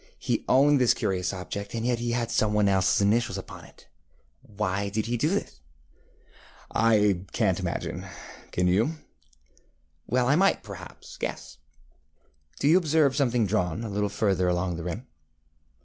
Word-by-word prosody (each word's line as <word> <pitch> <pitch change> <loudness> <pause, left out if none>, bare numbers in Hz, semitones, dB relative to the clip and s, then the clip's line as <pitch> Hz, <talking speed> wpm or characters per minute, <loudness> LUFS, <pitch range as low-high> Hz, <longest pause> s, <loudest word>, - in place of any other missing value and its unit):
He - - -2
owned 140 +1 +5
this 125 - +4
curious 90 -2 -1
object, 100 +3 -6
and 115 0 -2
yet 120 -1 +1
he 120 0 -2
had 120 -1 -1
some 105 -2 +1
one 105 -1 +3
elseŌĆÖs 95 0 +3
initials 115 +4 +1
upon - - -9
it. - - -19 0.5
Why 100 -1 -3
did 110 +2 -2
he 120 +1 -1
do 125 +7 +1
this? 175 - -3 1.1
ŌĆØ 115 -1 +4
ŌĆ£I 100 -3 +1
canŌĆÖt 95 -6 0
imagine; 90 -3 -4 0.5
can 90 0 +1
you? 95 +5 +3
ŌĆØ 160 - -3 1.2
ŌĆ£Well, 125 +1 +2
I 140 +4 +3
might, 195 +4 +2
perhaps, - - -11
guess. - - -6 1.0
Do 140 - +1
you 170 +5 +6
observe 155 -5 +2
something 125 -5 +2
drawn 95 -1 -1
a 115 - -4
little 105 0 -1
further 100 -3 +1
along 90 0 0
the 85 - -6
rim? 90 +9 -5
105 Hz, 165 wpm, -26 LUFS, 95-120 Hz, 1.2 s, you